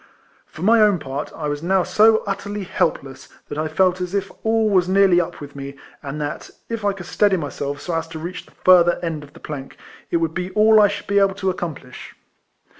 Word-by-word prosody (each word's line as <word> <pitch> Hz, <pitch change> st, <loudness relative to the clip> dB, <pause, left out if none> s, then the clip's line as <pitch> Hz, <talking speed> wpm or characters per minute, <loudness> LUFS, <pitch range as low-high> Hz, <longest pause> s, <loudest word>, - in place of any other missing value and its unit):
For 155 Hz, -, -10 dB
my 225 Hz, +3 st, +5 dB
own 210 Hz, -3 st, +4 dB
part, 140 Hz, -1 st, -5 dB
I 150 Hz, -, -4 dB
was 145 Hz, 0 st, -3 dB
now 185 Hz, +2 st, +2 dB
so 220 Hz, +3 st, +4 dB
utterly 200 Hz, 0 st, -4 dB
helpless, 135 Hz, -6 st, -2 dB, 0.2 s
that 145 Hz, -, -5 dB
I 155 Hz, -, -1 dB
felt 185 Hz, +3 st, +1 dB
as 180 Hz, +2 st, -3 dB
if 195 Hz, -1 st, -2 dB
all 225 Hz, 0 st, +2 dB
was 185 Hz, -3 st, +2 dB
nearly 190 Hz, -2 st, +5 dB
up 170 Hz, -, -6 dB
with 145 Hz, -1 st, -10 dB
me, 140 Hz, 0 st, -7 dB, 0.3 s
and 145 Hz, +1 st, -6 dB
that, 145 Hz, 0 st, -5 dB, 0.2 s
if 230 Hz, -2 st, -4 dB
I 205 Hz, -, +2 dB
could 190 Hz, -3 st, -9 dB
steady 200 Hz, +2 st, +2 dB
myself 145 Hz, -2 st, -4 dB
so 175 Hz, -, -4 dB
as 165 Hz, 0 st, -2 dB
to 160 Hz, 0 st, -8 dB
reach 170 Hz, +3 st, -6 dB
the -, -, -20 dB
further 175 Hz, -2 st, +6 dB
end 160 Hz, -3 st, -3 dB
of 145 Hz, -, -15 dB
the -, -, -14 dB
plank, 140 Hz, -3 st, -8 dB, 0.3 s
it -, -, +1 dB
would 165 Hz, -1 st, -1 dB
be 180 Hz, +1 st, -3 dB
all 215 Hz, +1 st, +6 dB
I 205 Hz, -, +6 dB
should 205 Hz, 0 st, -5 dB
be 200 Hz, 0 st, +2 dB
able 195 Hz, -1 st, +2 dB
to 190 Hz, -1 st, -1 dB
accomplish. 160 Hz, -8 st, -7 dB
180 Hz, 225 wpm, -21 LUFS, 150-200 Hz, 0.3 s, further